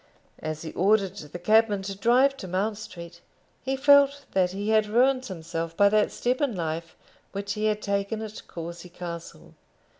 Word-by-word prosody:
As 155 0 -5
he 160 - -6
ordered 195 0 +2
the 150 -1 -8
cabman 215 +1 +3
to 195 0 -5
drive 250 +7 +3
to 190 - -7
Mount 200 +4 -1
Street, 170 -4 -10 0.4
he 265 +1 -1
felt 285 0 +5
that 185 -2 +2
he 200 +3 -4
had 215 -1 +3
ruined 255 +4 +2
himself 165 -2 -5
by 200 0 +6
that 210 0 +2
step 250 +3 -1
in 275 -7 0
life 165 -1 -4 0.4
which 200 0 -3
he 215 0 -2
had 215 0 0
taken 200 +2 -1
at 215 0 -7
Courcy 170 +1 -8
Castle. 170 -1 -8
200 Hz, 175 wpm, -26 LUFS, 175-220 Hz, 0.4 s, by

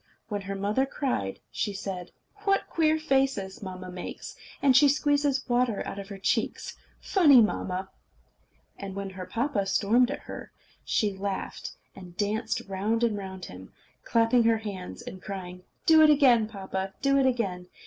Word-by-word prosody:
When 205 -2 -2
her 195 0 -5
mother 210 +7 0
cried, 250 - -2
she 205 - -2
said: 190 -2 -5 0.3
"What 395 -1 +1
queer 315 -1 +2
faces 270 -10 0
mamma 185 -2 -7
makes! 180 0 -7 0.2
And 270 -2 +4
she 290 +2 +7
squeezes 285 -1 +1
water 245 -3 +1
out 200 - -5
of 195 - -7
her 200 - -7
cheeks! 195 - -1 0.2
Funny 300 -10 +6
mamma!" 190 -4 0 0.9
And 195 -1 -6
when 200 -1 -4
her 185 -1 -8
papa 225 -1 -1
stormed 230 +6 +3
at 280 - -4
her, - - -9 0.3
she 210 -2 +1
laughed, 195 0 -4 0.2
and 180 -2 -12
danced 215 +2 -1
round 205 +4 -1
and 230 -3 +2
round 190 -2 -6
him, 95 +1 -11 0.3
clapping 230 +1 +3
her 225 -1 +4
hands, 200 -4 -7
and 185 - -9
crying: 180 -2 -7 0.2
"Do 320 -1 +7
it 310 - +7
again, 255 -7 +5
papa. 190 -2 -5
Do 275 0 +4
it 265 - +4
again! 195 -8 -1
210 Hz, 160 wpm, -27 LUFS, 190-265 Hz, 0.9 s, she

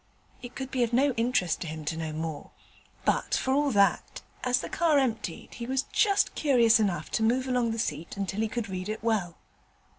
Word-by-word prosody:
It 245 0 -9
could 265 0 -5
be 255 - -1
of 235 0 +1
no 275 +3 +4
interest 230 -8 0
to 170 - -4
him 155 0 -6
to 160 - -2
know 160 -1 -4
more; 155 -1 -5 0.6
but - - +1
for 260 - 0
all 290 +1 +2
that, 200 -5 +1 0.2
as 250 0 +2
the - - -5
car 325 -3 +2
emptied, 225 -10 -2
he 235 0 -6
was 265 +1 0
just 400 -2 +2
curious 235 -6 +4
enough 180 -7 -1
to - - 0
move 250 +4 +2
along 250 -2 +1
the 225 - -2
seat 165 -5 -3
until 195 +1 -3
he 225 - +1
could 235 +1 -4
read 185 +1 -5
it 215 0 -4
well. 205 -7 0
225 Hz, 210 wpm, -28 LUFS, 185-255 Hz, 0.6 s, no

